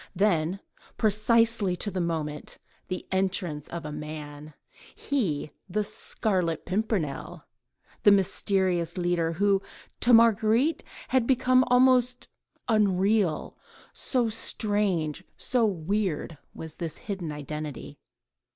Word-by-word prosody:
—then, 180 -2 +1 0.4
precise 230 +2 +3
to 195 0 -1
the 185 - -2
moment, 155 -3 -3 0.3
the 185 -1 -5
entrance 185 -6 -1
of 170 -2 -6
a 150 - -5
man, 150 0 -8 0.4
he, 175 - -2 0.2
the 210 +4 0
Scarlet 190 -5 -2
Pimpernel, 175 - -2 0.6
the - - +6
mysterious 190 -3 +1
leader, 175 -2 0
who 195 +2 +2 0.4
to 245 - +3
Marguerite 230 +5 +4 0.3
had 255 -3 +2
become 255 0 +4
almost 250 0 +3 0.4
unreal, 200 -4 +1 0.4
so 250 -3 0
strange, 205 -7 -1
so 245 -3 +1
weird 185 -3 -2 0.2
was 160 -1 -9
this 165 -3 -4
hidden 190 -6 -5
identity. 150 -1 -6
190 Hz, 105 wpm, -27 LUFS, 160-220 Hz, 0.6 s, the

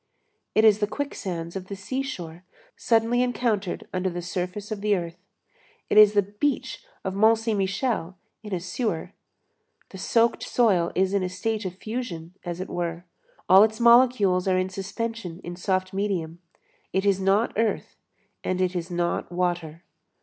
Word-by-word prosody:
_ - - -52 0.5
It 220 - +5
is 215 -1 +6
the 210 - +1
quicksands 185 -11 -4
of 185 -1 -5
the 200 - -5
seashore 195 - -5 0.3
suddenly 230 +1 +2
encountered 230 -6 -1
under 185 0 0
the 175 0 -5
surface 180 +4 -4
of 210 -2 -4
the 210 0 +2
earth; 170 -1 -5 0.7
it - - +3
is 210 -1 +8
the 205 -1 +4
beach 205 +9 -2 0.2
of 190 - -2
Mont 220 +3 +5
Saint 225 -2 -1
Michel 195 -2 -1 0.2
in 210 -1 -9
a 185 - -1
sewer. 185 0 -3 0.8
The 190 - -10
soaked 230 +4 +2
soil 190 -8 +2
is 190 +1 +2
in 200 - +2
a 185 - -1
state 210 +4 -2
of 185 -1 -4
fusion, 195 -6 -5
as 175 -1 -5
it 185 - -4
were; 170 0 -4 0.4
all 190 +1 +8
its 220 0 +3
molecules 235 -6 +5
are 185 -1 +3
in 185 0 0
suspension 195 -1 -5
in 175 0 -6
soft 185 +1 -1
medium; 185 -5 -2 0.5
it 190 +2 0
is 195 -1 +3
not 195 +4 +2
earth 225 0 -1 0.5
and 185 0 -1
it 185 0 0
is 175 0 -3
not 175 0 -1
water. 175 -2 -2
190 Hz, 170 wpm, -25 LUFS, 180-220 Hz, 0.8 s, is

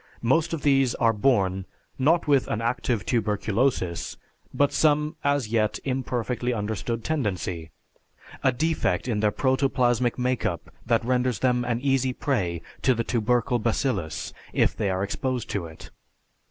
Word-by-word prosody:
Most 155 +8 +2
of 165 -4 -3
these 135 -3 +3
are 115 -1 +3
born, 100 -5 +1 0.3
not 160 +5 +3
with 140 -3 +3
an 105 - -1
active 115 -3 -1
tuberculosis, 105 -4 0 0.3
but 145 0 +2
some 150 +1 +2
as 140 -5 +1
yet 110 -2 +1
imperfectly 125 -2 -1
understood 110 +1 -3
tendency, 95 - -2 0.7
a 130 - +3
defect 130 - 0
in 110 -4 0
their 105 0 +3
protoplasmic 125 -2 +1
make 125 -2 0
up 85 - -3 0.2
that 115 -1 +2
renders 125 -1 +1
them 125 -1 +1
an 120 -1 -1
easy 135 -2 +1
prey 95 - -1 0.2
to 130 - +3
the 115 - -1
tubercle 120 +2 +1
bacillus 110 - -1 0.2
if - - +2
they 105 - -1
are 95 +1 0
exposed 125 +3 -2
to 90 -5 -2
it. 80 0 -13
120 Hz, 145 wpm, -25 LUFS, 105-130 Hz, 0.7 s, these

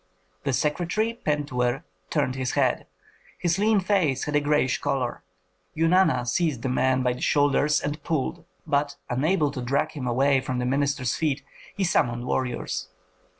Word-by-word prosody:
The 140 - +1
secretary, 175 - 0
Pentuer, 145 - -1 0.3
turned 130 - 0
his 130 -1 -2
head; - - +1 0.5
his 175 +1 0
lean 215 0 +4
face 180 -9 +1
had 150 - -2
a - - +5
grayish 145 -3 +1
color. 135 -4 -2 0.6
Eunana 165 -6 +3
seized 150 -2 0
the 130 - 0
man 130 0 +2
by 125 -1 +2
the 125 - -9
shoulders 145 +1 +3
and 150 +1 -4
pulled, 160 +2 -2 0.2
but, 145 -2 0 0.2
unable 150 +4 +1
to 130 - -5
drag 140 +5 0
him 135 -5 -5
away 135 +2 +3
from 130 -1 -3
the 125 - -1
minister's 140 -1 0
feet, 145 -3 -1 0.3
he 200 - +1
summoned 120 -8 +1
warriors. 125 -8 -2
145 Hz, 155 wpm, -25 LUFS, 130-160 Hz, 0.6 s, a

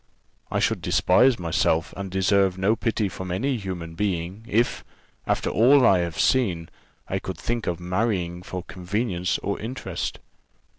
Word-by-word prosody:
"I - - -1
should - - +1
despise 125 +7 +4
myself 85 -1 0
and 100 -1 -5
deserve 95 0 +2
no 100 +4 +2
pity 110 -3 0
from 95 0 -7
any 125 +9 0
human 90 -5 -6
being, 95 +2 -2
if, 115 +3 +1 0.4
after - - 0
all 130 +4 +5
I 95 - +5
have 85 -2 -3
seen, 95 -11 +2 0.4
I 95 - -1
could 95 -2 -6
think 120 +5 -3
of 85 -1 -1
marrying 90 -1 -1
for 90 0 -6
convenience 90 +1 -2
or 100 - -2
interest." 125 +4 -4
95 Hz, 150 wpm, -24 LUFS, 90-110 Hz, 0.4 s, all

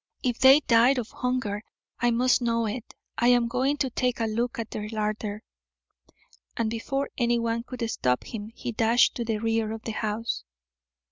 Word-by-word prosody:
If 245 -2 -1
they 265 +3 +8
died 240 +2 +4
of 240 -2 -3
hunger 250 -5 -2 0.4
I 240 +1 +3
must 250 +2 +3
know 230 -1 +1
it. 220 +2 -5 0.2
I 240 - +3
am 245 -1 +4
going 260 +4 0
to 265 -3 -1
take 250 0 0
a 225 - +1
look 230 +2 -1
at 225 -2 -5
their 210 0 -5
larder." 215 0 -3 1.1
And 225 -1 0
before 270 +5 -2
anyone 235 -1 +1
could 240 -1 -5
stop 125 - 0
him 215 -2 -7
he 245 - -4
dashed 230 +2 +3
to 240 - -1
the 225 -2 -1
rear 225 0 0
of 220 0 -6
the 225 - -3
house. 220 +1 -2
230 Hz, 180 wpm, -26 LUFS, 220-245 Hz, 1.1 s, they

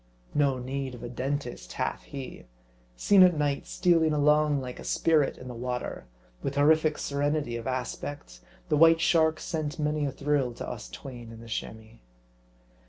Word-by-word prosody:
No 140 -3 +2
need 130 +1 -4
of 120 - -11
a 120 - -5
dentist 125 - -4
hath - - -2
he. 135 - -9 0.5
Seen 195 - +5
at 180 -3 +6
night, 145 -2 -1
stealing 165 -3 +3
along 150 0 +3
like 125 -1 -7
a - - -8
spirit 155 -4 +2
in 125 - -10
the 125 - -6
water, 125 - -4 0.3
with 135 - -3
horrific 155 +1 +4
serenity 145 -3 -1
of 115 +1 -5
aspect, 130 - -5 0.3
the 150 - +3
White 165 +1 +7
Shark 160 -2 +3
sent 155 0 -3
many 150 -1 0
a - - -2
thrill 140 -3 0
to - - -6
us - - -7
twain 120 - -9
in 115 - -11
the 115 - -11
Chamois. 110 0 -6
140 Hz, 170 wpm, -28 LUFS, 125-150 Hz, 0.5 s, White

